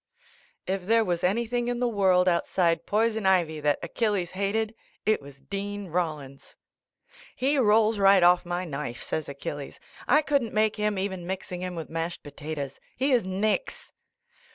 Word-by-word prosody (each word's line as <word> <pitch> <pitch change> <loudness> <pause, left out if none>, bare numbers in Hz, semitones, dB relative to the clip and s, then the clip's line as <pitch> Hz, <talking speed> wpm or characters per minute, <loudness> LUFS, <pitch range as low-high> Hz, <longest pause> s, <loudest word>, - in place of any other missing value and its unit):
If 190 -1 -2
there 225 0 +4
was 175 -1 -1
anything 235 +5 0
in 245 0 -1
the 245 - +2
world 190 -5 +3
out 170 -1 +2
side 170 -3 +1
poison 220 -1 +1
ivy 170 -5 +2
that 150 -1 +2
Achilles 205 -6 -1
hated, 210 +3 -1 0.3
it 215 -5 +2
was 140 -1 -14
Dean 200 +3 -5
Rollins. 150 -5 -4 0.8
"He 275 +2 +1
rolls 220 -2 +4
right 195 -2 +6
off 175 0 +5
my 175 +1 -3
knife," 140 -6 -5
says 155 -2 -3
Achilles, 140 0 -6 0.3
"I 300 +4 +5
couldn't 280 -7 0
make 215 0 +2
him, 210 -1 0
even 190 -2 -3
mix 190 0 -5
ing 180 0 -4
him 180 -1 -4
with 165 -2 -5
mashed 165 +1 -3
potatoes. 145 -1 -6 0.2
He 270 +2 +1
is 245 -4 +4
nix." 210 - -2
190 Hz, 165 wpm, -27 LUFS, 170-220 Hz, 0.8 s, right